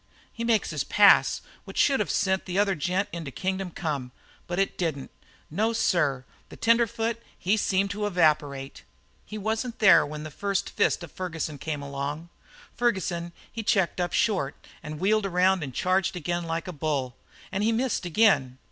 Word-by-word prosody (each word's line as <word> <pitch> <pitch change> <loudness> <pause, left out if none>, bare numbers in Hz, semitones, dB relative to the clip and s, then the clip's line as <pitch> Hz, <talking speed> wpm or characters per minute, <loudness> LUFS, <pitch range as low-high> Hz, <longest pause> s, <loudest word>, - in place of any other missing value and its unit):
"He 230 - -5
makes 230 -6 +1
his 150 -3 -1
pass, 205 +8 +5 0.2
which - - -10
should 275 -3 +4
have 210 - -1
sent 190 -1 +1
the 185 +1 -3
other 200 -1 +3
gent 180 +4 -1
into 165 -4 -5
kingdom 190 +5 -3
come. 145 -7 -4 0.4
But 175 - -3
it 195 0 +1
didn't. 155 -6 -3 0.4
No, 220 +8 +1
sir, 145 - +1 0.2
the - - -11
tenderfoot, 230 0 +1 0.2
he 195 +4 +1
seemed 195 -2 +1
to 210 +1 -2
evaporate. 150 -7 +1 0.5
He 215 - -6
wasn't 225 +3 -2
there 200 -3 +7
when 150 +1 -6
the 155 - -7
fist 200 0 0
of 165 - -9
Ferguson 165 -5 -4
come 150 -1 -4
along. 140 +4 -5 0.5
Ferguson, 185 -7 -1 0.2
he 230 - -4
checked 190 -4 +1
up 175 -1 -1
short 180 -6 +1 0.3
and 150 0 -7
wheeled 205 +2 +2
around 185 0 +3
and 140 -3 -4
charged 185 +7 +1
again 175 0 -2
like 165 +1 -3
a 180 - -5
bull. 140 -5 -2 0.4
And 195 - -1
he 225 - +3
missed 240 0 0
again. 170 - +3
180 Hz, 170 wpm, -26 LUFS, 155-205 Hz, 0.5 s, there